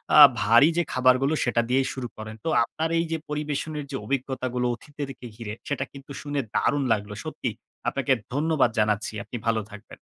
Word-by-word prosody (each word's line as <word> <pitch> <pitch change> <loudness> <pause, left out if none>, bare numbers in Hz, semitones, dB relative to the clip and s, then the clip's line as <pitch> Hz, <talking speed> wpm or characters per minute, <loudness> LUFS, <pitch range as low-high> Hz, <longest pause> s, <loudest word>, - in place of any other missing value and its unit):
আ - - +9 0.2
ভারী 115 +8 +6
যে 175 - +4
খাবারগুলো 130 +3 +3
সেটা 120 -1 +2
দিয়েই 130 +1 +2
শুরু 130 -2 -4
করেন। 110 0 -7
তো - - +1
আপনার 160 +7 -2
এই 165 - +2
যে 165 - +1
পরিবেশনের 150 0 -3
যে 135 - -3
অভিজ্ঞতাগুলো 130 -2 -1
অতিথিদেরকে 140 0 -8
ঘিরে, 110 -2 -6
সেটা 140 -2 -1
কিন্তু 140 0 -12
শুনে 145 -1 -2 0.2
দারুণ 145 -1 +2
লাগলো। 105 -1 -3
সত্যিই - - -4 0.3
আপনাকে 135 -1 -1 0.2
ধন্যবাদ 150 -3 +3
জানাচ্ছি। 105 0 +1
আপনি 120 - -6
ভালো 110 -1 +2
থাকবেন। 105 - -12
130 Hz, 170 wpm, -26 LUFS, 115-145 Hz, 0.3 s, আ